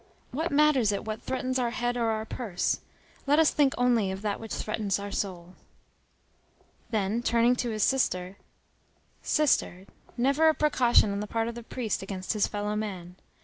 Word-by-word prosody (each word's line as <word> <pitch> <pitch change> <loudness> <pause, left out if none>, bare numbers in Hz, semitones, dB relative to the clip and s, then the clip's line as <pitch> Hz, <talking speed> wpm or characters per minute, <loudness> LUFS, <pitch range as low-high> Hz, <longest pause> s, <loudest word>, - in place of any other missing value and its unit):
What 320 +6 -2
matters 285 -7 +4
it 200 +1 -3
what 215 0 -4
threatens 255 0 -2
our 245 -1 +1
head 245 0 -2
or 230 -2 0
our 220 0 -1
purse! 215 -6 -2 0.5
Let 290 +2 +4
us 320 -1 +5
think 280 -2 +2
only 240 -5 +2
of 190 +2 -5
that 205 -2 -1
which 225 -1 -9
threatens 215 -3 -1
our 200 0 -6
soul." 180 -3 -4 1.4
Then, 215 0 0
turning 235 +1 +3
to 240 - -1
his 215 -2 -1
sister: 190 -8 0 0.8
"Sister, 260 - +1 0.3
never 280 +6 +4
a 315 - +2
precaution 245 -8 +3
on 200 - -2
the 210 - -4
part 225 +1 -1
of 235 - -4
the 235 - -8
priest, 230 -2 -3
against 190 0 -4
his 210 -2 +1
fellow 210 0 -3
man. 185 -5 -5
225 Hz, 175 wpm, -28 LUFS, 200-250 Hz, 1.4 s, us